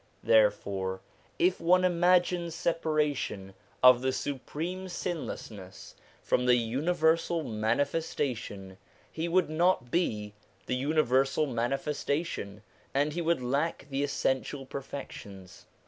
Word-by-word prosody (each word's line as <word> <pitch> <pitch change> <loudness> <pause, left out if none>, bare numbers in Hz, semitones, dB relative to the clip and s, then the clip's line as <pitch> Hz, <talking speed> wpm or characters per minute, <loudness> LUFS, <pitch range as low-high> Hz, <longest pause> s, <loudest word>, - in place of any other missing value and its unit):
Therefore 100 -3 +2 0.4
if 180 +1 +2
one 180 +2 +4
imagines 175 -1 +2
separation 150 - -1 0.3
of 125 -1 +8
the 130 0 +1
Supreme 165 +8 -4
Sinlessness 110 - -6 0.3
from 125 0 +1
the 125 - +6
universal 160 +7 +1
Manifestation, 115 -4 -2 0.3
he 160 +1 -3
would 170 -2 +2
not 160 -7 +2
be 105 - -1 0.3
the 125 - -1
universal 135 0 +2
Manifestation, 135 - -2 0.3
and 145 +2 +2
he 170 - -2
would 165 -5 +1
lack 140 +5 -1
the 135 +1 0
essen 130 -2 +1
tial 135 -2 -8
perfections. 105 -9 -8
140 Hz, 105 wpm, -29 LUFS, 115-165 Hz, 0.4 s, of